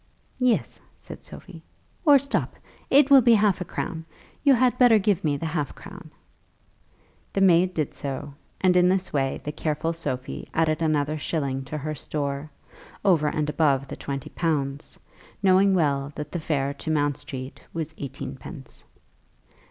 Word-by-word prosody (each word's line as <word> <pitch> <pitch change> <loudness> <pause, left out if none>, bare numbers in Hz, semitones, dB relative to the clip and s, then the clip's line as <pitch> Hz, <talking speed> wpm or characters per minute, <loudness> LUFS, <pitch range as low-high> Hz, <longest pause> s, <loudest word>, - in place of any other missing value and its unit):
"Yes," 250 -2 +1 0.2
said - - -10
Sophie, - - -11 0.4
"or 290 -2 +8
stop. 275 +1 -1 0.3
It 280 0 +5
will 275 -1 +9
be 235 -1 +6
half 205 -3 +2
a - - -2
crown. 165 -1 -4 0.4
You 280 -2 +6
had 250 0 +2
better 245 -3 +7
give 205 -3 +1
me 145 -3 +1
the 165 - -5
half 155 -3 -2
crown." - - -11 1.2
The 195 - 0
maid 180 -1 +4
did 155 -3 -1
so, 140 +1 -5 0.3
and 185 -1 +3
in 180 0 +5
this 185 -1 0
way 135 -2 0
the 150 - -3
careful 155 +2 -2
Sophie 130 -6 -4
added 160 -1 +1
another 155 -1 +1
shilling 140 -4 -2
to 155 - -5
her 155 +1 -4
store, 140 0 -3 0.6
over 165 -6 +4
and 150 0 -1
above 140 -3 +1
the - - -5
twenty 140 -2 -6
pounds, 145 -4 -2 0.5
knowing 190 +1 +5
well 140 -4 +1
that 150 0 -6
the 175 - -3
fare 140 -3 -1
to 150 - -7
Mount 145 -2 +1
Street 130 0 -8
was 160 -1 -4
eighteen 135 -1 -6
pence. 135 +2 -10
155 Hz, 160 wpm, -25 LUFS, 140-185 Hz, 1.2 s, will